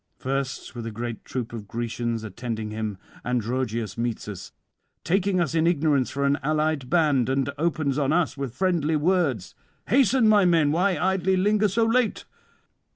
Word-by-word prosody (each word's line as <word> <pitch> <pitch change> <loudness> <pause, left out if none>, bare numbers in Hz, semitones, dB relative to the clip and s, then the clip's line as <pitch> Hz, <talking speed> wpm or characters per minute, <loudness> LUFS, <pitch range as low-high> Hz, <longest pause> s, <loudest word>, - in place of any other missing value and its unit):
'First, 135 0 -3
with 120 -2 -6
a - - -4
great 115 +1 -5
troop 120 -3 -5
of 110 -3 -7
Grecians 115 0 -3
attending 110 0 -5
him, 110 -2 -4 0.3
Androgeus 120 -3 -2
meets 115 -2 -2
us, 95 -2 -7 0.5
taking 190 +2 +1
us 165 -4 0
in 165 0 +2
ignorance 150 -5 +2
for 140 0 -2
an 140 +1 +2
allied 155 -2 0
band, 145 -7 +2
and 135 0 +1
opens 155 -4 0
on 140 -1 +1
us 170 -1 +1
with 135 -4 -5
friendly 170 -4 +1
words: 155 - 0 0.4
"Hasten, 255 -1 +4
my 210 -2 +5
men; 165 -5 +3
why 180 +4 +2
idly 190 0 +1
linger 210 +3 +3
so 225 +4 +1
late? 230 0 +1
145 Hz, 160 wpm, -25 LUFS, 120-180 Hz, 0.5 s, my